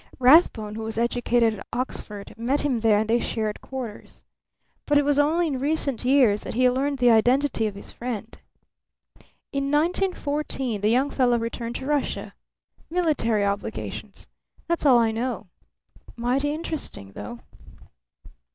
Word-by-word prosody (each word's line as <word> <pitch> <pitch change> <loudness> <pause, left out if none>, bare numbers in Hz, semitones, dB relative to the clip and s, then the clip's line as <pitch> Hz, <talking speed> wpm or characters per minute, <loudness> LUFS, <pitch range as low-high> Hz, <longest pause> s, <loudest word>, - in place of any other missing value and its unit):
Rathbone, 250 -6 +5
who 220 - -5
was 220 0 -5
educated 235 -1 +2
at - - -11
Oxford, 210 -5 -5
met 245 +6 0
him 270 -5 0
there 220 -2 +4
and 215 +1 0
they 230 +2 +3
shared 215 -3 -3
quarters. 255 -5 -8 0.6
But 290 - +4
it 290 - +3
was 290 0 +2
only 320 +4 +3
in 280 -5 -2
recent 280 -3 -1
years 245 -5 +4
that - - -6
he 255 +1 +4
learned 275 +2 -1
the 245 -2 +5
identity 245 +1 +3
of 205 - -6
his 200 - -10
friend. 230 -2 -6 1.2
In 275 0 0
1914 295 - -1
the 210 - +2
young 260 +5 +2
fellow 245 -3 +2
returned 230 +1 -4
to 265 - -5
Russia. 290 -1 -2 0.6
Military 295 - +1
obligations. 200 0 -4 0.4
That's 335 -3 +1
all 255 -3 +7
I 230 -1 +3
know. 225 -3 -3 0.7
Mighty 255 +5 0
interesting, 300 - -5
though." 105 +4 -8
245 Hz, 145 wpm, -25 LUFS, 225-285 Hz, 1.2 s, all